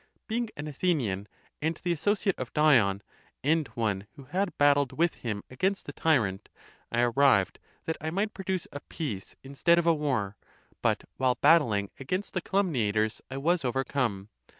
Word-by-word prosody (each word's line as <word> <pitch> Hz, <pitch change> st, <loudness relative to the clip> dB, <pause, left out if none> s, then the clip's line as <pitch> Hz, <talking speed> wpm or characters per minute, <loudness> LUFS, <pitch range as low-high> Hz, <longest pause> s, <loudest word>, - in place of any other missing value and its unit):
Being 230 Hz, +1 st, -1 dB
an 145 Hz, +1 st, -5 dB
Athenian, 135 Hz, -, -1 dB, 0.3 s
and 160 Hz, +2 st, 0 dB
the 175 Hz, -, +1 dB
associate 200 Hz, +3 st, 0 dB
of 130 Hz, -, -4 dB
Dion, 115 Hz, -11 st, +4 dB, 0.4 s
and 155 Hz, +1 st, +2 dB
one 105 Hz, -4 st, -1 dB
who 140 Hz, -, -11 dB
had 180 Hz, +7 st, -2 dB
battled 145 Hz, -1 st, +4 dB
with 170 Hz, +1 st, +3 dB
him 105 Hz, -4 st, -4 dB
against 190 Hz, +10 st, -1 dB
the 145 Hz, -, -7 dB
tyrant, 110 Hz, -14 st, +1 dB, 0.4 s
1 120 Hz, 0 st, +1 dB
arrived, 135 Hz, -9 st, +4 dB, 0.3 s
that 160 Hz, -, -2 dB
I 155 Hz, -, -2 dB
might 200 Hz, +6 st, -1 dB
produce 190 Hz, -2 st, -3 dB
a 145 Hz, -, -6 dB
peace 130 Hz, -, -6 dB
instead 140 Hz, +5 st, +2 dB
of 170 Hz, -, +2 dB
a 170 Hz, -, +5 dB
war; 130 Hz, -10 st, -1 dB, 0.4 s
but -, -, +1 dB
while 130 Hz, -1 st, +2 dB
battling 120 Hz, -9 st, +4 dB
against 185 Hz, +9 st, -3 dB
the 185 Hz, -, -1 dB
calumniators 115 Hz, -, 0 dB
I 135 Hz, -, -5 dB
was 170 Hz, +4 st, +1 dB
overcome. 125 Hz, -5 st, -1 dB
140 Hz, 160 wpm, -28 LUFS, 115-170 Hz, 0.4 s, a